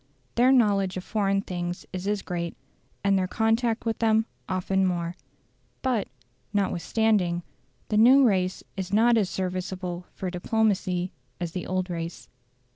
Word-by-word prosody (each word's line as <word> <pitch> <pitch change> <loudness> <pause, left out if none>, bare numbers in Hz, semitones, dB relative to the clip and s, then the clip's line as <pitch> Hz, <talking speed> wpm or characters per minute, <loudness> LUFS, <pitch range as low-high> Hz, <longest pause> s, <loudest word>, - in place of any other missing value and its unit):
Their 250 +2 +5
knowledge 200 -7 +3
of 185 - -4
foreign 195 -2 +1
things 175 -2 -4
is 185 +1 -4
as 205 -1 0
great, 170 -2 -4 0.5
and 200 -1 +3
their 185 - 0
contact 225 +2 +1
with 225 -1 -1
them 220 -1 +3 0.2
often 190 +1 +1
more. 175 -2 -1 0.7
But, 250 -6 +1 0.4
notwithstanding, 195 -2 +1 0.5
the 210 - +1
new 255 +5 +7
race 185 -6 +2
is 190 -1 -4
not 230 +3 +5
as 205 -5 +2
serviceable 185 -1 -3
for 185 -2 -3
diplomacy 185 -2 0 0.3
as 175 -2 -3
the 180 0 -5
old 185 0 -1
race. 165 0 -5
190 Hz, 140 wpm, -26 LUFS, 180-220 Hz, 0.7 s, new